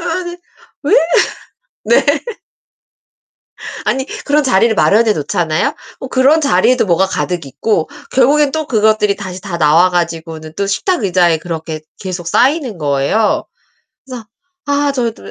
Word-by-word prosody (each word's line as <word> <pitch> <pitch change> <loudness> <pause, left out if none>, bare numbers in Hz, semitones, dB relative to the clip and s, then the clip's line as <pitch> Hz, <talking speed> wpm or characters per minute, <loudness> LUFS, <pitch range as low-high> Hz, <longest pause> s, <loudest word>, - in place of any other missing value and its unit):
아니 350 0 -4 0.5
왜? 285 - -1 0.9
네. 480 - +4 1.8
아니 265 +1 -1 0.2
그런 295 +1 +2
자리를 230 -2 +3
마련해 215 +1 +3
놓잖아요? 160 +1 -1 0.3
어 265 - -6
그런 275 +5 +3
자리에도 250 -2 +2
뭐가 185 +1 +2
가득 175 -5 -3
있고 165 +4 -1 0.2
결국엔 280 +2 +3
또 315 -2 -2
그것들이 215 -3 +2
다시 185 -2 -7
다 185 -4 -5
나와 165 +4 +4
가지고는 165 -2 -3
또 200 0 -1
식탁 305 - -1
의자에 175 -4 +2
그렇게 160 -2 -6 0.2
계속 180 -3 -5
쌓이는 260 - +1
거예요. 145 +9 0 0.6
그래서 245 -4 -8 0.4
아 285 0 +1
저도 240 -3 -3
205 Hz, 280 characters per minute, -15 LUFS, 170-265 Hz, 1.8 s, 네